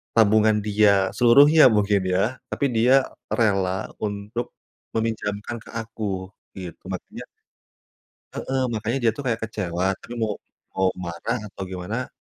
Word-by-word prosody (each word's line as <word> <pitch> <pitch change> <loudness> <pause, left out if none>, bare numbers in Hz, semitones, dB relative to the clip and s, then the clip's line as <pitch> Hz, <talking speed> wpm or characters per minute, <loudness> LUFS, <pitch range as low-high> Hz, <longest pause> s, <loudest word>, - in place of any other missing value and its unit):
tabungan 110 -1 +5
dia 100 -2 +3
seluruhnya 140 +6 +6
mungkin 100 -1 +2
ya, 105 +7 +1 0.2
tapi 140 - 0
dia 130 +4 +4 0.3
rela 95 -4 +1 0.2
untuk 105 +3 -4 0.4
meminjamkan 110 -1 -2
ke - - -15
aku, 115 0 -7 0.5
gitu. 90 -3 -9
Makannya 205 - -7 1.1
Heeh. 130 0 -2
Makanya 110 +4 -1
dia 115 - +4
tuh 145 - -5
kayak 115 -2 -1
kecewa, 95 -3 -1
tapi 120 - -10
mau 110 -2 0 0.4
mau 95 -1 +2 0.2
marah 85 +8 -3 0.2
atau - - -9
gimana, 105 +7 -4
110 Hz, 130 wpm, -24 LUFS, 100-115 Hz, 1.1 s, seluruhnya